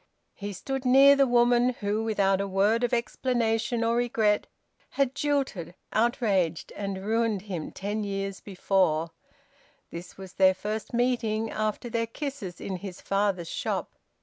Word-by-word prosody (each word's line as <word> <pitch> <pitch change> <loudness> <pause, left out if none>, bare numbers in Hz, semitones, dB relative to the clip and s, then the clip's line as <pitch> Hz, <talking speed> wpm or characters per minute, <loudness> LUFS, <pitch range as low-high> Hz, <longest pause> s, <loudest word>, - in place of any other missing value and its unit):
He 205 +1 -6
stood 265 +8 -4
near 270 +2 +7
the 275 -1 +4
woman 240 +1 +4
who 210 +1 -1
without 200 -3 +2
a 200 - -2
word 205 +5 +2
of 245 - +1
explanation 235 -1 0
or 230 +1 +2
regret 225 -3 +1 0.4
had 275 -2 0
jilted, 275 - -1 0.2
outraged, 205 -8 +1
and 195 -1 -4
ruined 220 -2 0
him 180 -7 -5
ten 205 +2 -3
years 195 -1 -3
before; 180 -4 0 0.8
this 170 +1 -9
was 190 -1 -10
their 190 -1 +4
first 215 +3 -4
meeting 235 -3 0
after 215 +2 -2
their 230 -1 -1
kisses 255 - -6
in 190 - -4
his 185 -1 -8
father's 195 -3 0
shop. - - -3
215 Hz, 145 wpm, -27 LUFS, 195-240 Hz, 0.8 s, near